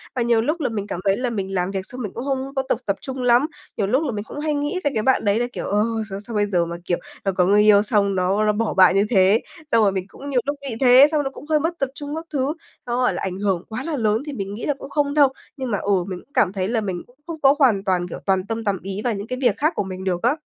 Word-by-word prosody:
và 250 - 0
nhiều 235 -1 +3
lúc 305 +9 -1
là 275 - 0
mình 205 -3 -4
cảm 185 - -4
thấy 195 0 +3
là 250 +1 -1
mình 195 -4 -3
làm 180 0 0
việc 190 -1 -4
xong 250 +4 -8
mình 210 -5 -4
cũng 240 - -5
không 270 0 -3
có 270 - +2
tục - - +1
tập 200 - 0
trung 265 -2 -5
lắm. 245 +2 +4 0.3
Nhiều 200 - 0
lúc 260 +9 +2
là 285 - -1
mình 205 -2 -4
cũng 285 - -8
hay 305 0 -1
nghĩ 290 +5 -1
về 285 - +1
cái 215 - 0
bạn 260 -1 +2
đấy 205 +2 +2
là, 240 - +1
kiểu, - - -4
ờ, 205 +1 +1 0.4
sao 230 - -6
bây 205 0 +2
giờ 180 -4 +1
mà, 170 0 -5
kiểu, 175 - 0 0.3
nó 195 - +1
có 180 -1 +2
người 205 +3 +5
yêu 210 -1 +6
xong 205 -3 +1
nó 190 +3 +1
nó 210 - +4
bỏ 225 +1 -1
bạn 185 -1 +6
như 200 +1 +4
thế. 195 0 +4 0.3
Xong 230 -1 +5
rồi 200 - +4
mình 190 -1 -3
cũng 280 +8 -10
nhiều 255 -3 +2
lúc 285 +1 -1
nghĩ 270 -5 -5
thế, 255 +2 +8
xong 300 -2 +1
nó 270 - -2
cũng 270 - -12
hơi 305 -1 +3
mất 335 +3 -2
tập 275 - 0
trung 290 +1 -5
các 320 +1 -5
thứ, 275 +1 0 0.3
nó 240 0 -2
gọi 250 0 +2
là - - -4
ảnh 190 0 -3
hưởng 195 -4 0
quá 235 +4 -4
là 325 0 -3
lớn 220 -1 +1
thì 295 - -5
mình 200 -5 -4
nghĩ 225 - -5
là 295 - +1
cũng 275 0 -11
không 285 -1 0
đâu. 290 -2 +5 0.3
Nhưng 260 -3 -3
mà, 205 - +1
ừ, 195 -2 +1
mình 185 -2 -5
cũng 285 - -40
cảm 195 - +2
thấy 190 -2 -1
là 225 0 0
mình 185 -4 -3
cũng 245 - -25
không 330 -2 -6
có 275 0 +6
hoàn 225 -9 +4
toàn, 180 -3 0
kiểu, 175 - -7
toàn 190 -1 +1
tâm 225 0 -3
tầm 200 -4 -1
ý 195 +2 -5
vào 240 - +1
những 200 +1 -5
cái 255 +1 -4
việc 240 -6 +2
khác 310 +6 +1
của - - 0
mình 190 -1 -7
được 180 -2 -1
á. 245 +5 +3
225 Hz, 320 wpm, -22 LUFS, 195-270 Hz, 0.4 s, thế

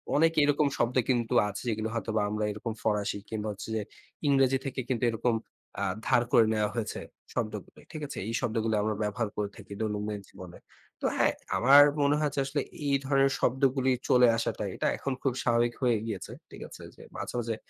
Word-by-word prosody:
অনেক 165 +2 +4
এরকম 145 0 +3
শব্দ 120 +2 0
কিন্তু 120 -2 +1
আছে 100 -1 -5
যেগুলো 110 0 -2
হয়তোবা 110 -2 -1
আমরা 105 0 -2
এরকম 110 +2 -5
ফরাসি 105 -1 0
কিংবা 110 -1 -3
হচ্ছে 100 +2 -8
যে 110 - 0 0.5
ইংরেজি 135 -1 +4
থেকে 135 0 -4
কিন্তু 125 -2 -1
এরকম 115 +1 0 0.5
আ - - +1 0.2
ধার 120 - +4
করে 115 - +6
নেওয়া 105 -1 +1
হয়েছে 115 -3 -3 0.3
শব্দগুলো। 110 -3 -4
ঠিক 155 - -7
আছে? - - -8
এই 115 - -3
শব্দগুলো 115 -2 0
আমরা 110 0 0
ব্যবহার 105 +2 -1
করে 105 -1 -2
থাকি 100 - -10
দৈনন্দিন 105 -1 -2
জীবনে। 90 -2 -11 0.4
তো - - -2
হ্যাঁ - - +3 0.2
আমার 140 +4 +8 0.2
মনে 140 +1 +3
হয়েছে 145 -1 0
আসলে 145 +1 -1 0.3
এই 140 - +3
ধরনের 135 0 +3
শব্দগুলোই 130 0 +2
চলে 125 -1 +6
আসাটাই, - - -2
এটা - - 0
এখন 135 - -2
খুব 135 - +1
স্বাভাবিক 120 0 +2
হয়ে 120 -3 +3
গিয়েছে। 105 -5 -5 0.2
ঠিক - - -11
আছে? - - -12 0.4
মাঝে - - -5
মাঝে 115 -1 -2
115 Hz, 185 wpm, -29 LUFS, 110-135 Hz, 0.5 s, আমার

